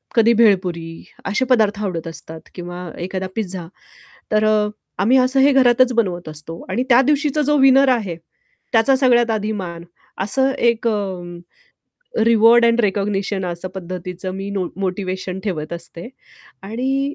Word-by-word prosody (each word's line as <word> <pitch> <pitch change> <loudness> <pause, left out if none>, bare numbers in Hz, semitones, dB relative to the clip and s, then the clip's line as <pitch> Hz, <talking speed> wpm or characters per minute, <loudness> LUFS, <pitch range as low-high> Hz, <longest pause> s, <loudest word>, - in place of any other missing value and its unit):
कधी 230 0 +5
भेळपुरी 180 -7 +1 0.2
असे 210 +6 0
पदार्थ 220 -5 +2
आवडत 170 -5 -3
असतात 160 0 -9
किंवा 175 0 -7
एखादा 185 +1 -4
पिझ्झा. 185 -5 -4 0.7
तर 215 0 +3
अ, 215 -1 +2 0.3
आम्ही 240 +6 +4
असं 260 +1 +2
हे 280 +2 +5
घरातच 255 -1 +4
बनवत 185 -8 -1
असतो 155 +2 -9
आणि 245 - -1
त्या 245 0 +6
दिवशीचा 295 +1 +1
जो 295 +1 +2
विनर 270 0 +5
आहे, 215 -9 0 0.6
त्याचा 240 +4 +4
सगळ्यात 240 -3 +3
आधी 215 -1 -1
मान. 170 -1 -7 0.4
असं 265 +7 +1
एक 235 -1 +1
अ, 195 -4 -2 1.0
रिवॉर्ड 230 +1 +5
एंड 235 0 +3
रिकॉग्निशन 200 -2 -1
असं 175 +1 -5
पद्धतीचं 180 0 -6
मी 195 +1 -5
नो 195 -3 -2
मोटिव्हेशन 185 -1 -3
ठेवत 160 -7 -4
असते. 170 +3 -8 0.5
आणि 265 +7 -2
210 Hz, 145 wpm, -19 LUFS, 180-240 Hz, 1.0 s, त्या